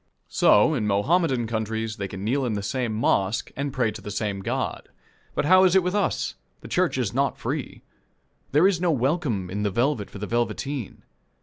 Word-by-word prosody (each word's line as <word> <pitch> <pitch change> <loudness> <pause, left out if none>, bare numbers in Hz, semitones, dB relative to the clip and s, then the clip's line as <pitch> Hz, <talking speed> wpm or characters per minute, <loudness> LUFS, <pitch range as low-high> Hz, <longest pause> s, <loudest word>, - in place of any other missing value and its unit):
So 105 +10 +4
in 115 -8 -1
Mohammedan 130 - +2
countries 110 0 -3
they 100 -2 -3
can 95 0 -7
kneel 130 +6 0
in 120 -3 -1
the 100 -1 -3
same 125 +1 -2
mosque, 105 -2 0
and 140 0 -2
pray 125 -4 0
to 105 - -9
the - - -7
same 105 -1 -2
God. 95 - -3 0.5
But - - 0
how 185 +4 +6
is 185 -1 +4
it 190 - +5
with 180 +1 -1
us? 205 -1 0 0.3
The - - -10
church - - +1
is - - -1
not - - 0
free. - - -4 0.7
There 150 +7 +5
is 185 -3 0
no 180 - +2
welcome 135 - 0
in 100 +2 -3
the 105 - +1
velvet 120 +1 0
for - - -10
the 105 - -4
velveteen. 120 +2 -3
120 Hz, 200 wpm, -25 LUFS, 105-150 Hz, 0.7 s, how